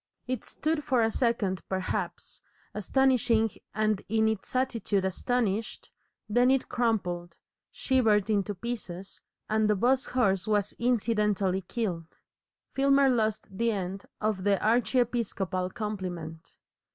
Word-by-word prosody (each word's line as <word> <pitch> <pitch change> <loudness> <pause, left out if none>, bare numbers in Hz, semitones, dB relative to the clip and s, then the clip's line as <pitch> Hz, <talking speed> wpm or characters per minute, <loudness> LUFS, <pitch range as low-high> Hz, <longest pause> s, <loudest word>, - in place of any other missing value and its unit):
It 255 -3 -3
stood 310 0 -2
for 255 -4 +2
a 225 - +2
second 215 -7 0
perhaps, 190 -1 -3 0.3
astonishing 230 -1 +2 0.2
and 215 -2 +1
in 220 0 +3
its 220 +2 -3
attitude 230 -6 0
astonished, 220 +2 -1 0.4
then 245 +4 +3
it 265 -1 +2
crumpled, 180 -8 -1 0.3
shivered 220 -6 +2
into 205 -1 0
pieces, 195 -4 -6 0.3
and 215 0 +2
the 210 - +4
'bus 255 +6 +2
horse 195 -7 +1
was 210 -1 +1
incidentally 210 -5 +1
killed. 180 -5 -4 0.6
Filmer 275 0 +4
lost 220 -5 0
the 230 +3 +1
end 195 -1 -4
of 210 -3 -1
the 200 0 +3
archiepiscopal 225 -6 +1
compliment. 180 -6 -6
215 Hz, 115 wpm, -28 LUFS, 190-240 Hz, 0.6 s, the